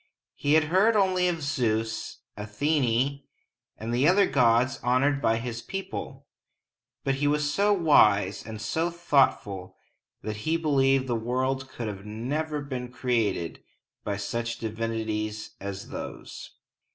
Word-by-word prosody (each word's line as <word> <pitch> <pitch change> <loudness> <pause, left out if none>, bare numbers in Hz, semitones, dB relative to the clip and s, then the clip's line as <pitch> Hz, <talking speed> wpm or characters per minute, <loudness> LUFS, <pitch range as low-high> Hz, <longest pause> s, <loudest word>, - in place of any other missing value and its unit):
He 145 +1 0
had 160 - +5
heard 190 +8 +3
only 185 -3 +3
of 165 -3 -2
Zeus, 115 -5 -1
Athene, 130 +4 0 0.6
and 115 +2 -4
the 130 +5 +3
other 195 +3 +5
gods 125 -1 +3
honored 135 +3 +2
by 115 -3 +2
his 115 0 -4
people; 190 -7 -6 0.8
but 135 - +1
he 145 - +3
was 145 0 +1
so 205 +1 +3
wise 105 - +4
and 110 -1 -7
so 160 +10 -1
thoughtful 130 - +1 0.5
that 110 0 -4
he 160 +10 0
believed 135 -4 +2
the 120 -2 -1
world 130 +3 -1
could 105 -6 -6
never 145 +9 -3
have 140 - -10
been 125 -2 -4
created 115 -10 -1 0.4
by 100 -1 -2
such 115 +3 -3
divinities 110 -1 -3
as 100 0 -6
those. - - -7
125 Hz, 135 wpm, -27 LUFS, 110-145 Hz, 0.8 s, had